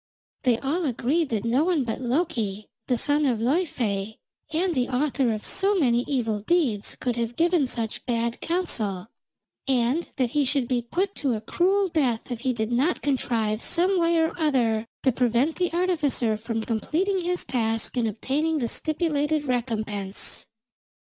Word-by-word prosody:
They 245 -3 +3
all 295 +8 -1
agreed 280 +5 0
that 220 -1 -2
no 250 +6 +3
one 340 -5 +2
but 230 +1 -4
Loki, 240 - -1 0.2
the 250 - +2
son 290 +5 +1
of 245 -3 +1
Laufey, 225 - -1 0.3
and 345 +3 +1
the 255 -3 0
author 265 -1 +1
of 215 -1 -3
so 400 +1 +3
many 245 -9 +3
evil 225 -6 0
deeds, 235 - 0
could 245 -2 -2
have 235 0 -2
given 335 -3 +2
such 230 -3 -3
bad 235 -1 -1
counsel, 220 - 0 0.6
and 260 +5 +1
that 250 -4 0
he 295 - +2
should 270 -2 0
be 245 -1 +1
put 365 +12 -1
to 270 -5 0
a - - -3
cruel 385 - +2
death 260 -9 0
if 240 - -3
he 260 +1 0
did 225 -1 -2
not 270 +9 +1
contrive 230 -6 0
some 360 +2 +2
way 335 0 +3
or 320 0 +2
other 235 -8 +1 0.2
to 265 - +4
prevent 250 +5 +1
the 360 -1 0
artificer 315 -10 +1
from 225 +1 -3
completing 335 - 0
his 360 0 -1
task 225 -2 -1
and 240 -2 +1
obtaining 285 +9 -1
the 245 -5 0
stipulated 305 +1 0
recompense. 215 -6 -3
255 Hz, 165 wpm, -25 LUFS, 230-320 Hz, 0.6 s, to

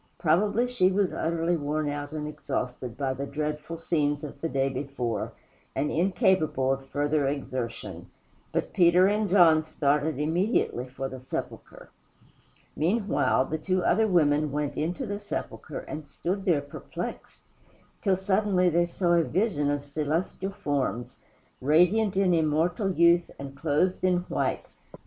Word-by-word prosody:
Probably 205 +9 +2
she 220 -7 +2
was 195 -1 +1
utterly 165 +1 0
worn 150 0 -1
out 145 0 -4
and 150 -1 -4
exhausted 125 -5 -4
by 135 -1 -1
the 140 +2 -5
dreadful 150 +3 -4
scenes 145 -3 0
of 150 - -8
the 165 - -1
day 135 -2 +1
before, 130 -5 -3 0.4
and 150 - 0
incapable 165 -6 +2
of 135 0 -7
further 145 +1 0
exertion. 115 - -4 0.4
But - - -2
Peter 175 +1 +5
and 210 +1 +1
John 170 -4 +6
started 150 -1 0
immediately 160 - 0
for 135 +1 -5
the 130 -1 -8
sepulchre. 130 - -7 0.8
Meanwhile, 195 - +1
the 160 +2 -3
two 185 +2 0
other 220 +4 +3
women 150 -5 +3
went 145 0 -2
into 175 - -2
the 205 -2 -4
sepulchre - - -5
and 155 -1 -7
stood 185 +7 -3
there 165 -7 +3
perplexed, 145 0 -7 0.6
till 195 -2 +3
suddenly 190 -1 +2
they 175 +1 +2
saw 175 0 +1
a 170 -1 +4
vision 165 -4 0
of 145 -1 -1
celestial 155 +6 -2
forms, 135 - -2 0.4
radiant 180 +8 +3
in 190 -2 +3
immortal 165 +5 +1
youth 170 0 +4
and 140 0 -8
clothed 160 +6 0
in 180 -1 +3
white. 180 - -2
155 Hz, 145 wpm, -27 LUFS, 145-180 Hz, 0.8 s, John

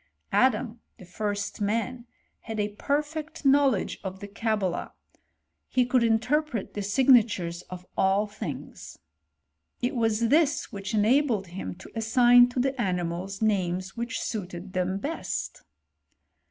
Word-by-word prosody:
Adam, 240 -2 +2 0.2
the 185 - -13
first 205 +3 -3
man, 230 +4 -1 0.3
had 225 -2 -6
a 210 0 0
perfect 295 +5 -3
knowledge 275 -6 +3
of 190 -1 -5
the 200 - -7
Cabala; 210 -3 -2 0.7
he 250 -1 +2
could 250 -1 +2
inter 230 +6 +3
pret 245 -10 -6
the 205 - -3
signatures 205 -6 +3
of 180 0 -8
all 195 +2 +3
things. 140 - -7 0.8
It 250 +3 -1
was 225 -1 +1
this 295 -1 +2
which 200 +1 -4
enabled 225 -1 +3
him 180 0 -6
to 190 - -13
assign 245 +2 +5
to 245 - -3
the 265 0 0
animals 180 +1 -2
names 185 -3 0
which 235 +1 -3
suited 185 -3 -5
them 185 +1 0
best. 295 +11 -4
215 Hz, 130 wpm, -27 LUFS, 190-245 Hz, 0.8 s, assign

